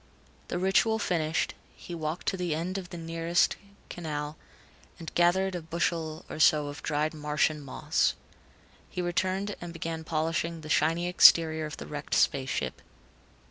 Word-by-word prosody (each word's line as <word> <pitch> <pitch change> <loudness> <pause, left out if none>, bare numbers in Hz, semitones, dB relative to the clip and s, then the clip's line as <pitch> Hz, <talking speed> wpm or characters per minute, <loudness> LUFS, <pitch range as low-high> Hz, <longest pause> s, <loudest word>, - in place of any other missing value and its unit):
The - - -2
ritual 195 +5 +3
finished, 165 -6 0 0.2
he 175 - -9
walked 160 +1 -4
to - - -2
the 175 -4 -1
edge 180 +4 -2
of 180 -2 -9
the 175 - -7
nearest 165 +1 +1 0.3
canal, 150 -3 -4 0.6
and 165 -2 -8
gathered 185 +2 +3
a 175 - -3
bushel 165 -1 -2
or - - -7
so 150 -2 +4
of 145 - -8
dried 155 +1 0
Martian 150 0 0
moss. 140 -2 0 0.7
He - - -6
returned 185 +3 -1
and 175 -1 -6
began 165 -1 -4
polishing 165 +1 -1
the 155 - -9
shiny 165 +3 +2
exterior 160 -3 +6
of 150 - -8
the - - -7
wrecked 145 -1 -4
space 135 -1 +2
ship. - - -3
165 Hz, 155 wpm, -29 LUFS, 155-175 Hz, 0.7 s, exterior